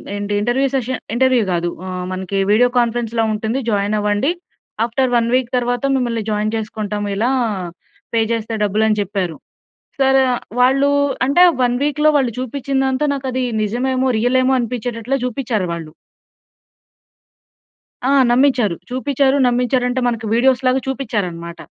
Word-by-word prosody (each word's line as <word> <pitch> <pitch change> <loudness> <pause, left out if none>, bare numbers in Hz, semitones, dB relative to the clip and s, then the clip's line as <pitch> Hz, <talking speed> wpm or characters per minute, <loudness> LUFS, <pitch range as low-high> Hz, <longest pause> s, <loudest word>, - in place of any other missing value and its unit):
ఏంటి 205 0 -3
interview 245 +5 +1
session 255 -1 -2
interview 255 -1 +3
గా‌దు 175 0 0 0.2
ఆహ్, 185 -1 -4
మనకి 190 +1 -3
వీడియో 245 +4 +4
కాన్ఫరెన్స్‌‌లా 235 -1 0
ఉంటుంది. 220 +4 -2
జాయిన్ 205 0 0
అవ్వండి. 210 +8 +1 0.5
ఆఫ్‌టర్ 250 +2 0
వన్ 230 -1 +1
వీక్ 255 -2 0
తరువాత 245 0 -1
మిమ్మల్ని 235 -4 -1
జాయిన్ 210 +1 -1
చేసుకుంటాం 210 -1 -4
ఇలా 225 +5 +1 0.8
పే 230 - +3
చేస్తే 230 -1 -2
డబ్బులు 210 +2 +1
అని 215 -1 +1
చెప్పారు. 190 -5 -3 0.6
సరే 270 0 +4
వ - - +1 0.3
వాళ్ళూ 270 +3 +4 0.4
అంటే 285 +7 +5 0.2
వన్ 245 -1 +2
వీక్‌లో 300 +1 +2
వాళ్ళు 260 -4 +1
చూపించిందంతా 265 +1 -1
నాకు 275 -1 -5
అది 255 0 -1 0.2
నిజమేమో! 255 +4 0
రియలేమో! 255 +3 +2
అనిపించేటట్లు 240 +1 -3
చూపించారు 235 -5 -2
వాళ్ళు. 165 -2 -7 2.1
ఆ! 265 - +2 0.2
నమ్మించారు. 245 -6 +3 0.2
చూపిచ్చారు, 270 +1 +1
నమ్మించారంటే, 250 +1 +1
మనకు 230 -2 -3
వీడియోస్‌లాగా 255 +1 +2
చూపిచ్చారనమాట. 195 -11 -4
240 Hz, 130 wpm, -18 LUFS, 215-260 Hz, 2.1 s, అంటే